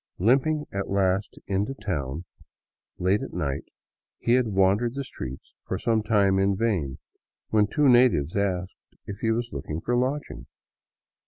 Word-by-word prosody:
Limping 135 - +2
at 100 0 -3
last 95 0 0
into 100 +7 -1
town, 75 - -3 0.7
late 95 +3 +2
at - - -6
night, 75 -6 -2 0.5
he 120 - +1
had 125 -1 +3
wandered 100 +4 +2
the 140 - -2
streets 65 - -8
for - - -1
some 115 -2 +1
time 100 -3 +3
in 100 0 +2
vain, 95 - 0 0.5
when 105 -1 +3
two 145 +7 +2
natives 120 - +4
asked 95 -2 -3
if 100 0 -7
he 115 - 0
was 120 +1 0
looking 75 +1 -4
for 120 +7 -1
lodging. 125 - -2
100 Hz, 150 wpm, -26 LUFS, 90-120 Hz, 0.7 s, natives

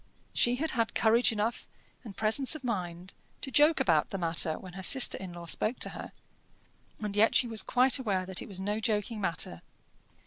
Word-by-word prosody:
She 240 +1 +2
had 315 +5 -1
had 230 -3 -1
courage 230 +2 +3
enough, 220 +2 -3 0.4
and 210 -5 -11
presence 235 +7 +2
of 310 - -9
mind, 180 -6 -4 0.3
to 270 - -6
joke 300 +4 +4
about 160 -4 +2
the 195 - -4
matter 165 -2 -1
when 185 -2 -11
her 190 - -7
sister 265 +7 +4
in 190 -2 -8
law 175 0 -9
spoke 215 +8 0
to - - +1
her, - - -9 0.9
and 210 -2 -4
yet 215 +2 +3
she - - +4
was 225 -3 0
quite 255 +5 +2
aware 195 -7 -1
that 190 -1 -2
it - - -8
was 195 -3 -6
no 205 +3 -2
joking 215 0 -2
matter. 165 - -2
210 Hz, 200 wpm, -29 LUFS, 185-240 Hz, 0.9 s, joke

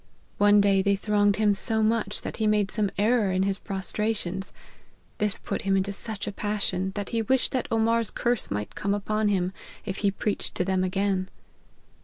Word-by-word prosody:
One 205 0 +6
day 200 -1 +4
they 200 +1 +2
thronged 205 0 +2
him 210 -1 +3
so 220 +2 0
much 215 -2 0
that - - -5
he 220 - +1
made 210 -2 +2
some 210 -2 0
error 215 -1 +2
in 185 +1 +1
his 195 0 0
pros* 195 -2 -2
trations. 195 -4 -2 0.7
This 210 -1 0
put - - -4
him 195 -2 +2
into 195 +1 -1
such 215 0 -3
a 205 - -3
passion, 195 -2 -1
that 205 -2 -3
he 230 -1 0
wished 260 +4 +1
that 255 - -1
Omar's* 230 0 +2
curse 240 -3 -1
might 105 +1 -3
come 200 0 -1
upon 215 +1 0
him, 190 -2 +1 0.3
if 195 -2 -4
he 200 - +2
preached 200 +1 -3
to 180 - 0
them 190 -1 +1
again. 190 0 0
205 Hz, 195 wpm, -26 LUFS, 195-215 Hz, 0.7 s, One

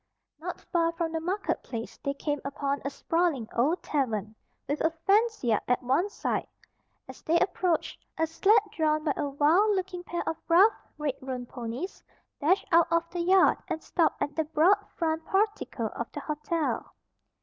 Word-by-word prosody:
Not - - -5
far 335 -1 0
from 330 -1 -2
the 325 - -1
market 365 +6 -2
place 230 -2 -6
they 280 0 -2
came 290 0 -2
upon 280 0 -2
a 280 - -1
sprawling 325 -5 0
old 295 +10 +1
tavern, 220 -8 -1 0.3
with 290 +3 -1
a 320 - +3
fenced 410 +7 +1
yard 225 -4 +2
at 250 +1 +1
one 275 +11 +2
side. - - -2 0.6
As - - -11
they 330 +2 +2
approached, 360 -2 0
a 325 - +2
sled 390 +7 +4
drawn 310 -5 +1
by 300 -3 +1
a 285 - -2
wild 330 +10 +3
looking 370 -1 -3
pair 345 -1 -4
of 325 - -1
rough, 380 +7 +7 0.2
red 300 -3 -1
roan 255 -2 -4
ponies, 245 +9 -6 0.4
dashed 345 +7 +2
out 335 0 +5
of 335 0 +2
the 350 - -2
yard 370 +2 +5
and 320 - -4
stopped 335 -3 +1
at 290 - -4
the 320 - +1
broad 330 +7 +3
front 320 -1 0
portico 415 +4 0
of - - -6
the - - -5
hotel. 300 +1 -2
320 Hz, 175 wpm, -28 LUFS, 280-360 Hz, 0.6 s, rough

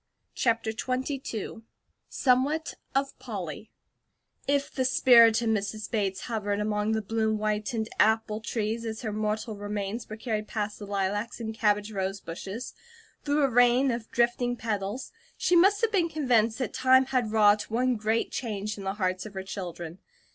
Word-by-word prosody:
CHAPTER 230 -2 +1
XXII 255 -2 -3 0.5
SOMEWHAT 275 +5 +1 0.2
OF 275 0 0
POLLY 210 - -6 0.8
IF 280 0 +1
THE 260 - 0
spirit 235 -3 +6
of 230 - +1
Mrs. 215 0 -2
Bates 195 -4 -1
hovered 205 -3 -2
among 210 +1 0
the 220 -1 -1
bloom 220 +1 0
whitened 215 +2 -1
apple 220 -1 +3
trees 225 0 -2
as 225 0 -5
her 215 -2 -2
mortal 215 +1 -2
remains 205 +2 -4
were 215 - -6
carried 215 -2 -3
past 210 -2 -3
the 205 - -8
lilacs 205 +3 -2
and 220 -1 -4
cabbage 210 -1 +1
rose 195 -1 -2
bushes, 195 +7 -7 0.5
through 290 0 +2
a - - +5
rain 245 +2 +5
of 235 -1 -4
drifting 240 +1 +1
petals, 215 +1 -3 0.3
she 355 - +2
must 390 +4 +5
have 455 -1 +2
been 355 -5 +2
convinced 240 -8 +2
that 255 - -3
time 260 0 +5
had 250 -4 0
wrought 210 -1 +4
one 250 +3 +1
great 220 +1 0
change 210 -3 -3
in - - -7
the 195 +1 -2
hearts 185 -1 -1
of 205 - -13
her 190 - -4
children. 175 -3 -6
220 Hz, 160 wpm, -28 LUFS, 210-245 Hz, 0.8 s, spirit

